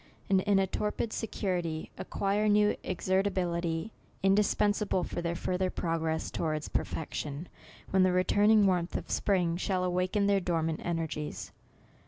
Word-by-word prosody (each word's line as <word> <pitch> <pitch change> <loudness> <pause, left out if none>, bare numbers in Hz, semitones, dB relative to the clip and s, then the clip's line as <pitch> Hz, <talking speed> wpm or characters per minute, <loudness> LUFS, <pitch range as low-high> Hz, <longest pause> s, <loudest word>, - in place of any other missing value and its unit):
and 190 -1 +5
in 200 0 +2
a 195 - +3
torpid 210 +3 -2
security, 175 -7 -2
ac - - -7
quire 205 +2 +1
new 210 0 +4
exertability, 180 -2 -1 0.3
indispensable 205 0 +2
for 175 - -4
theii 170 0 -2
further 185 +1 -1
progress 165 -2 -2
towards 155 -2 -2
perfection, 150 +1 -3 0.4
when 190 - +4
the 185 0 +4
returning 205 +3 +4
warmth 180 -2 +1
of - - -7
spring 180 -4 +1
shall 185 0 0
awaken 185 +3 +1
their 200 -1 +3
dormant 165 -3 -1
energies. 160 -3 -3
185 Hz, 135 wpm, -30 LUFS, 170-200 Hz, 0.4 s, and